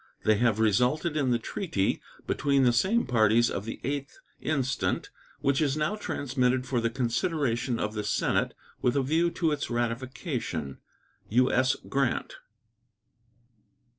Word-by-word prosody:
They 110 -1 +4
have 115 -1 +2
resulted 125 - +2
in 140 -4 +1
the 120 - +3
treaty 115 - -1 0.2
between 140 -1 +2
the 120 -2 +4
same 200 - +2
parties 115 -1 +3
of 100 - -3
the 115 - -6
8th 140 0 -3 0.2
instant, 135 -4 -1 0.3
which 140 +2 +2
is 145 -1 +1
now 155 +7 0
transmitted 130 -9 0
for 125 -3 0
the 115 - +1
consideration 125 0 0
of 105 - -2
the 105 -1 -3
Senate 105 - 0 0.3
with 125 - +2
a 140 - +2
view 160 +5 +2
to 165 -2 0
its 145 -1 -2
ratification. 120 - -3 0.5
U.S. 130 +2 +3
GRANT. 135 -3 -1
130 Hz, 135 wpm, -28 LUFS, 115-145 Hz, 0.5 s, They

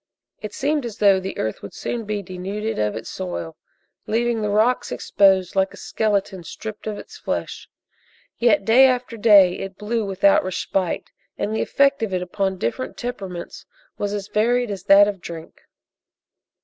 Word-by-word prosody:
It 215 -1 -7
seemed 295 +1 0
as 230 -3 -6
though 200 -2 +5
the 190 +1 -6
earth 110 -1 -3
would 100 - -10
soon 235 -2 -4
be 205 -1 -3
denuded 195 +4 -4
of 105 -1 0
its 110 - -6
soil, 85 -2 -5 0.5
leaving 235 0 0
the 210 - -1
rocks 220 +5 +2
exposed 190 -2 +2
like 190 0 +1
a - - -15
skeleton 200 -4 -1
stripped 215 +5 -8
of 210 -1 -3
its - - -11
flesh. - - -4 0.7
Yet, 210 -5 +3
day 255 +5 +7
after 250 -2 -1
day, 200 -5 +5
it 195 0 -6
blew 220 +2 -2
without 195 0 +3
respite, 185 0 -2 0.3
and 215 +2 -2
the - - 0
effect 275 -2 +2
of 205 -4 -1
it 180 - -1
upon 190 +1 -2
different 180 - -3
temperaments 195 -8 -6 0.3
was 205 -1 -1
as 205 -1 -4
varied 240 +2 +1
as 195 -3 -6
that 200 +1 +7
of 200 -3 -4
drink. 165 -2 -9
205 Hz, 170 wpm, -22 LUFS, 190-225 Hz, 0.7 s, day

